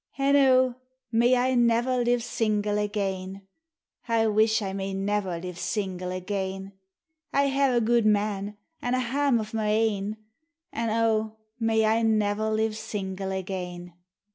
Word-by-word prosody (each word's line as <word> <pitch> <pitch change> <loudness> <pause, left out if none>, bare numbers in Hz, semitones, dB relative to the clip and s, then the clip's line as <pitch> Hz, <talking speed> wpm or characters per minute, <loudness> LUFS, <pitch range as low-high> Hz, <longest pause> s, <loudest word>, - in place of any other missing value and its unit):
An' 275 +1 +3
O! 260 -2 +5 0.4
may 240 +2 +4
I 255 +1 +2
never 240 +1 +2
live 240 0 +1
single 210 -2 0
again, 195 -2 -3 0.6
I 230 -1 +2
wish 220 +1 +3
1 195 -3 -4
may 195 0 -3
never 195 -2 -1
live 180 0 -7
single 185 -4 -3
again; 190 +1 -4 0.6
I 280 0 +2
hae 275 -2 +2
a - - +4
gudeman, 210 -3 +1 0.2
an' 245 +1 0
a - - +1
hame 260 0 +1
o' 215 - -3
my 220 -1 -1
a 220 +1 +3
in, 205 +2 -5 0.6
An 225 -1 0
()! 220 +2 -44
may 225 -1 +2
I 220 +1 +2
never 215 -1 +1
live 220 0 0
single 190 -2 -4
again. 180 -2 -5
215 Hz, 145 wpm, -26 LUFS, 195-235 Hz, 0.6 s, O